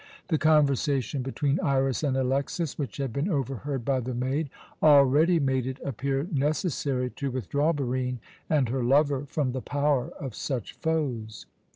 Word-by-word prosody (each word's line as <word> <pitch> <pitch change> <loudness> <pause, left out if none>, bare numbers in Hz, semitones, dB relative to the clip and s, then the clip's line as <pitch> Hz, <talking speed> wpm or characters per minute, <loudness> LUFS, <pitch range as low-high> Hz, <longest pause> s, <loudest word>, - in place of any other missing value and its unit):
The 160 -4 +2
conversation 140 -3 +2
between 135 +2 -1
Iras 135 0 +1
and 135 -3 +1
Alexas, 135 +4 -1
which 140 -4 -5
had 135 -5 -3
been 145 +8 -1
overheard 135 - -2
by 135 -2 +1
the 125 0 -4
maid, 135 +5 -1 0.3
already 150 +3 +6
made 130 -3 0
it 130 0 -4
appear 135 +3 -2
necessary 140 -3 0
to 140 - -3
withdraw 140 - 0
Barine 130 -3 -2 0.3
and 145 -5 +3
her 130 +2 -1
lover 140 +2 +2
from 145 -3 -1
the 130 0 -4
power 145 -2 0
of 135 -5 -5
such 125 -3 -4
foes. 125 -9 -2
135 Hz, 155 wpm, -27 LUFS, 130-145 Hz, 0.3 s, already